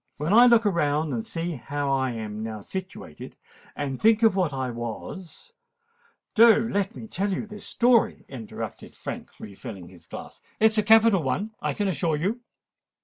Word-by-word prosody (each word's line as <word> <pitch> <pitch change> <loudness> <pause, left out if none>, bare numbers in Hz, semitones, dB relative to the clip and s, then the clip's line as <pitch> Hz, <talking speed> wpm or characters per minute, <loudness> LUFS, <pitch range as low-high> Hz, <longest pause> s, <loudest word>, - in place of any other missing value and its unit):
When 150 +6 -1
I 240 +3 +8
look 235 -2 +5
around 155 -5 +1
and 115 -2 -2
see 165 +2 -4
how 140 +3 -3
I 130 -1 +1
am 110 -2 -5
now 110 -1 -5
situated, 185 - -8 0.4
and 135 -3 -4
think 225 +1 +4
of 220 -4 +5
what 180 -6 +1
I 130 -2 -3
was——" 165 - -7 0.8
"Do 225 0 +6
let 200 0 -1
me - - -8
tell 200 -1 -2
you 190 - -2
this 210 -1 -7
story," 240 -1 +2
interrupted 120 -6 -8
Frank, - - -7
re 105 - -9
filling 95 -5 -9
his 85 -3 -17
glass: - - -10 0.2
"it 220 0 +5
is 220 - +2
a - - +5
capital 220 -2 +5
one, 155 +11 -2
I - - -1
can 205 -2 -1
assure 165 -2 0
you. 195 +11 -1
170 Hz, 180 wpm, -25 LUFS, 130-215 Hz, 0.8 s, I